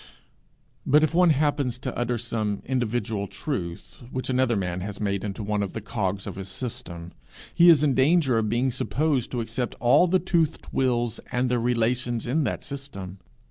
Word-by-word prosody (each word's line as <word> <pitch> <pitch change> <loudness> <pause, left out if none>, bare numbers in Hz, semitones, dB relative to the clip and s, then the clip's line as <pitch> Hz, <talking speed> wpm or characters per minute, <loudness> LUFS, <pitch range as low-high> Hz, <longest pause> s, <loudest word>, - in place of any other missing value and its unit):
But 150 +3 +4
if 155 - +1
one 180 0 +5
happens 145 -4 +1
to 130 0 -5
utter 120 0 -1
some 110 -3 -3
individual 115 -5 -1
truth 90 - -5
which 130 0 -3
another 130 -2 +2
man 90 -2 -2
has 105 +2 -6
made 100 -2 -1
into 105 +1 -4
one 105 0 -1
of 100 - -3
the - - -3
cogs 100 -2 -3
of - - -6
his 95 0 -6
system, 90 -6 -6 0.4
he 175 0 +7
is 155 -3 +6
in 145 -3 +3
danger 135 -2 +3
of 110 -1 -1
being 125 +4 +1
supposed 130 +4 0
to 120 - -2
accept 115 +2 -3
all 125 +9 +5
the 185 +2 +4
toothed 170 -3 0
wheels 120 -3 0
and 125 0 0
their 120 -1 +1
relations 120 0 0
in 140 +5 +1
that - - -3
system. 100 -10 -7
120 Hz, 180 wpm, -25 LUFS, 105-135 Hz, 0.4 s, he